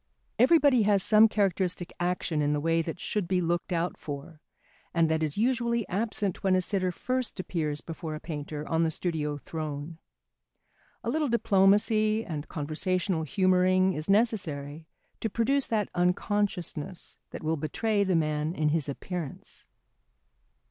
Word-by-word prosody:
Everybody 275 -1 +5
has 200 -2 +3
some 215 0 +6
characteristic 190 -4 -1
action 175 -3 -1
in 145 0 +1
the 150 - 0
way 165 +2 +2
that 165 +1 -5
should 205 -2 -2
be 185 0 +1
looked 175 +1 -1
out 175 0 -1
for 150 +2 -7 0.5
and 165 -1 +3
that 160 0 +1
is 155 0 -1
usually 235 -1 +1
absent 205 -1 -2
when 190 -1 +3
a 185 - +3
sitter 185 -1 0
first 255 +3 -2
appears 155 -5 -2
before 160 -1 -6
a - - -6
painter 150 -2 -6
on 165 0 +1
the 165 - +2
studio 155 -3 -2
throne. 155 +1 -6 1.0
A - - -2
little 300 0 0
diplomacy 215 0 +3
and 150 -3 -5
conversational 165 +4 -1
humouring 185 +2 +3
is 155 +2 -5
necessary 165 -9 +1 0.3
to 225 - -2
produce 260 +6 +1
that 215 -3 0
unconsciousness 180 -1 -1
that - - -8
will 160 +1 +1
betray 205 +8 0
the 190 -2 +1
man 155 +1 0
in 155 -1 +1
his 150 -2 0
appearance. 165 +1 -6
180 Hz, 150 wpm, -28 LUFS, 155-205 Hz, 1.0 s, some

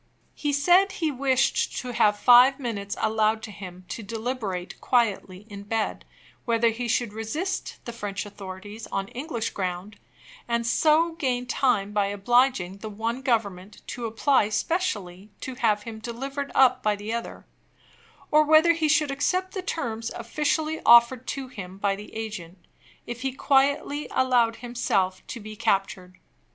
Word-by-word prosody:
He 295 - -2
said 355 +7 +4
he 320 -3 -1
wished 265 -1 +1
to 250 - -4
have 215 -3 +3
five 250 +5 +6
minutes 205 -6 -4
allowed 220 0 +1
him 185 -3 -10
to - - -5
deliberate 220 -4 -4
quietly 210 -5 0
in 200 -2 -9
bed, 215 +2 -2 0.4
whether 230 -1 +2
he 240 +2 -3
should 230 -1 0
resist 295 - -3
the 235 - -6
French 205 -3 -4
authorities 205 +2 -9
on 195 0 -3
English 245 -4 -4
ground, 185 +2 -4 0.5
and 235 0 0
so 315 +7 +3
gain 255 -6 -2
time 245 -6 +1
by 205 -1 +1
obliging 205 -2 +1
the 220 - -6
one 225 +4 -3
Government 205 -6 -2
to 240 -2 -4
apply 225 0 +2
specially 210 - -2
to 260 - -5
have 215 -4 +1
him 225 -1 -8
delivered 270 +5 -5
up 255 -1 +5
by 210 -3 +1
the 205 +2 -5
other 235 0 -5 0.9
or 305 0 +6
whether 315 +2 +6
he 320 -2 0
should 300 -1 +3
accept 365 +7 -1
the 380 - -3
terms 230 -10 -3
officially 305 +6 -1
offered 235 +1 +6
to 270 -1 -4
him 190 -7 -9
by 200 0 0
the 210 +1 -11
agent, 205 -6 -6 0.5
if 235 -1 -6
he 265 0 -1
quietly 280 +2 +1
allowed 245 -3 +2
himself 195 -7 -1
to 235 - -6
be 215 0 -9
captured. 195 -4 -1
230 Hz, 150 wpm, -25 LUFS, 205-265 Hz, 0.9 s, five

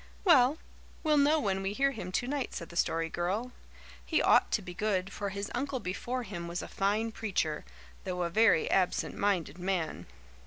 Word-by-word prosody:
"Well, 295 -5 +5 0.5
we'll 305 -2 +4
know 295 +3 +4
when 195 -6 0
we 195 +1 -2
hear 275 +5 +2
him 185 -8 -6
tonight," 260 +6 -2
said 170 - -6
the 170 - -11
Story 165 -1 +1
Girl. 190 +9 -2 0.5
"He 320 - +1
ought - - +5
to 215 - +1
be 180 -1 -7
good, 195 -1 -1
for 200 -1 -3
his 200 +1 -5
uncle 270 +1 -2
before 240 +6 -3
him 175 -6 -6
was 170 +1 -4
a - - -6
fine 210 +3 0
preacher, 185 -9 -2 0.4
though 180 -1 -2
a 170 - -2
very 220 -4 +4
absent 185 -2 +1
minded 180 -5 0
man. 180 -3 -2
200 Hz, 185 wpm, -31 LUFS, 180-245 Hz, 0.5 s, Well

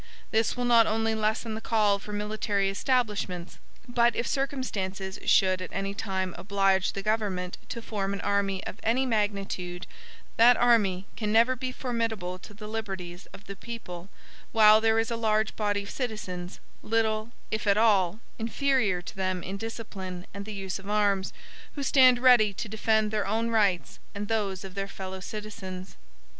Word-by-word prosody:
This 225 +2 +1
will 245 - -1
not 235 -2 +6
only 225 +1 +1
lessen 220 +1 -1
the 220 - -5
call 210 -3 +2
for 210 - -9
military 205 -1 -1
establishments, 200 -7 -1 0.3
but 240 -1 +3
if 235 - -1
circumstances 205 -9 -3
should 185 -1 +4
at 185 - -5
any 195 0 -2
time 190 -3 -2
oblige 195 -1 +2
the 195 - -5
government 200 -4 -1
to 235 -2 -5
form 200 -3 -2
an 200 - -3
army 200 -1 0
of - - -6
any 245 +4 +2
magnitude 200 -6 -2 0.5
that 240 +2 +7
army 205 -6 +3
can 210 -2 -2
never 235 +4 +4
be 255 0 -4
formidable 225 -8 -3
to - - -12
the 210 +1 -9
liberties 190 -5 -5
of 200 - -13
the 200 - -7
people 195 -5 -8 0.4
while 215 -1 +7
there 225 0 +3
is 225 +1 +1
a - - 0
large 220 -1 +1
body 205 -1 0
of 200 - -8
citizens, 190 -8 -5 0.2
little, 220 0 0 0.2
if 220 0 -2
at 200 0 +4
all, 205 -3 +3 0.2
inferior 225 -5 +1
to - - -9
them 185 -1 -2
in 190 - -4
discipline 195 -4 -6
and 200 0 -6
the 215 - -6
use 195 -1 -4
of 195 +1 -10
arms, 205 -2 +1 0.4
who 285 - -3
stand 255 -2 +6
ready 240 -5 +5
to 220 - -4
defend 220 0 +1
their 210 -2 -1
own 225 +3 0
rights 200 -6 +1 0.2
and 205 0 -4
those 200 -4 -1
of 190 -1 -8
their 195 0 -3
fellow 190 -1 -7
citizens. 195 -2 -7
210 Hz, 170 wpm, -28 LUFS, 195-225 Hz, 0.5 s, that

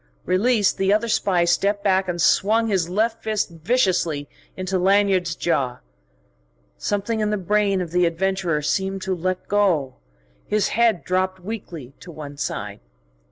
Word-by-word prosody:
Released, 205 +3 +2
the 195 0 +2
other 215 +3 +2
spy 185 -5 +2
stepped 200 +4 +1
back 190 -1 +2
and 175 -1 -3
swung 215 +6 +3
his 190 -6 0
left 225 +4 0
fist 215 -4 -1
viciously 170 - 0 0.3
to 185 0 -1
Lanyard's 190 -2 +2
jaw. 130 -7 -1 1.0
Something 205 - -2
in 210 -1 0
the 210 - 0
brain 200 0 +1
of 170 -3 -5
the 180 0 +3
adventurer 170 -2 -1
seemed 190 +4 -1
to 190 - -1
let 185 +1 -3
go; 180 -10 +1 0.5
his 210 -1 +1
head 225 -5 +2
dropped 185 0 -1
weakly 175 - -7
to 180 - -12
one 150 -2 -9
side. - - -4
190 Hz, 150 wpm, -22 LUFS, 175-205 Hz, 1.0 s, swung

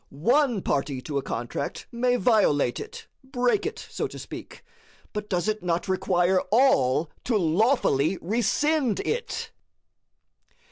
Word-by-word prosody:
One 240 - +1
party 140 -1 -1
to 145 -3 -2
a - - -4
contract 120 -2 -4
may 245 +1 +1
violate 210 - +2
it - - -8 0.2
break 260 +7 0
it, 445 +2 -5
so - - -2
to - - -10
speak; - - -9 0.5
but 210 -1 -5
does 180 0 0
it 215 0 -1
not 175 0 -1
require 185 0 +2
all 165 - +3
to 235 -4 +2
lawfully 180 - +2
rescind 240 - +1
it? 480 +1 -3
210 Hz, 130 wpm, -26 LUFS, 160-245 Hz, 0.5 s, all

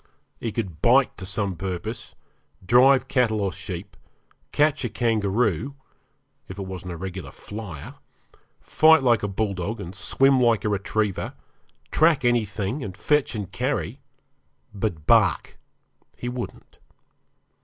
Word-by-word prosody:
He 115 - -3
could 95 -8 -4
bite 130 +3 +4
to 95 - -7
some 100 -1 -2
purpose, 90 0 -5 0.5
drive 130 +4 +5
cattle 115 -5 +1
or 100 -2 0
sheep, 90 0 -7 0.6
catch 150 -1 +2
a 120 - -1
kangaroo, 115 - 0 0.7
if 95 - -9
it 100 - -4
wasn't 95 -1 -6
a - - -7
regular 95 +1 -6
flyer, 105 -9 -8 0.7
fight 160 -2 +5
like 120 -3 +4
a 105 - -1
bulldog, 100 +1 -2
and 90 -2 -7
swim 135 +7 +3
like 115 -2 +3
a - - +2
retriever, 100 0 -1 0.6
track 160 -4 +3
anything, 110 +1 0
and 95 -2 -7
fetch 150 +2 +1
and 100 -3 -5
carry, 90 - -2 0.7
but 95 -7 -3
bark - - +3 0.6
he 120 - -5
wouldn't. 125 0 -7
105 Hz, 130 wpm, -24 LUFS, 95-120 Hz, 0.7 s, drive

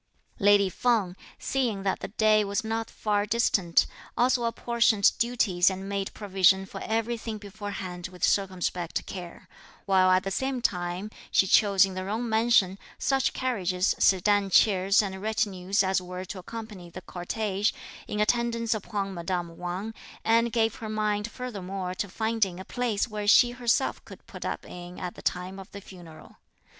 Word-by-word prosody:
Lady 205 -1 +5
Feng, 200 -2 0 0.2
seeing 235 -7 -1
that 195 -1 0
the - - -5
day 215 0 +3
was 200 +3 -2
not 225 0 -3
far 205 -1 0
distant, 200 -6 +2 0.3
also 245 0 +2
apportioned 230 -3 +3
duties 220 -7 +2
and 190 +1 -5
made 200 -1 -3
provision 195 -2 +3
for - - -9
everything 225 0 -2
beforehand 200 -3 -6
with 180 0 -12
circumspect 180 -3 0
care; 180 -3 -8 0.4
while 190 -1 +4
at 185 0 +4
the 195 - -3
same 265 +5 -1
time 180 -1 -2 0.2
she - - +4
chose 200 0 +5
in 190 - -6
the 185 0 -4
Jung 220 +5 -2
mansion, 220 -4 +3 0.2
such 270 -1 +1
carriages, 190 -8 0
sedan 200 +1 +3
chairs 195 +1 +4
and 190 -1 -5
retinue 200 -4 -2
as 190 0 +1
were 180 +1 -7
to 190 +1 -7
accompany 210 -3 -8
the 180 +2 -9
cortege, 200 +3 -2 0.4
in 210 - -3
attendance 230 +1 +1
upon 200 -2 -3
madame 175 -1 -3
Wang, 180 +6 -5 0.3
and 230 +1 +3
gave 225 -1 +2
her 220 - -6
mind 210 0 -1
furthermore 195 -7 -5
to 195 +2 -4
finding 220 -3 -1
a 190 - -8
place 245 -4 -1
where 210 -2 -5
she 240 +3 +6
herself 245 -1 0
could - - -13
put - - -9
up - - -4
in 175 0 -9
at 180 -1 -5
the - - -12
time 185 +2 -3
of 195 - -11
the 200 - -8
funeral. 175 -5 -14
200 Hz, 160 wpm, -27 LUFS, 185-225 Hz, 0.4 s, she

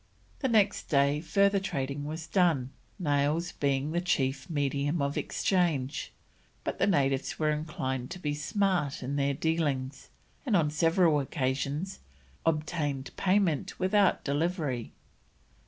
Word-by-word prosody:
The 265 - 0
next 210 -4 +2
day 140 0 +3
further 200 +4 +3
trading 145 -6 -3
was 160 +2 -5
done, 160 -7 +2 0.3
nails 150 +1 +1
being 140 +1 0
the 175 +1 0
chief 135 -4 0
medium 145 +1 0
of 140 0 -1
exchange, 160 -8 0 0.5
but - - -3
the - - +3
natives 140 -7 +1
were 155 -1 +2
inclined 130 -4 -3
to 180 - -6
be 150 -5 -2
smart 175 -3 0
in 135 +3 -3
their 140 0 +1
dealings, 145 -4 -1 0.3
and 240 -7 +1
on 155 -5 +3
several 165 0 +3
occasions 140 +5 -2 0.5
obtained 150 -3 -1
payment 185 -6 +1
without 190 +1 +3
delivery. 145 - -1
150 Hz, 125 wpm, -29 LUFS, 140-175 Hz, 0.5 s, day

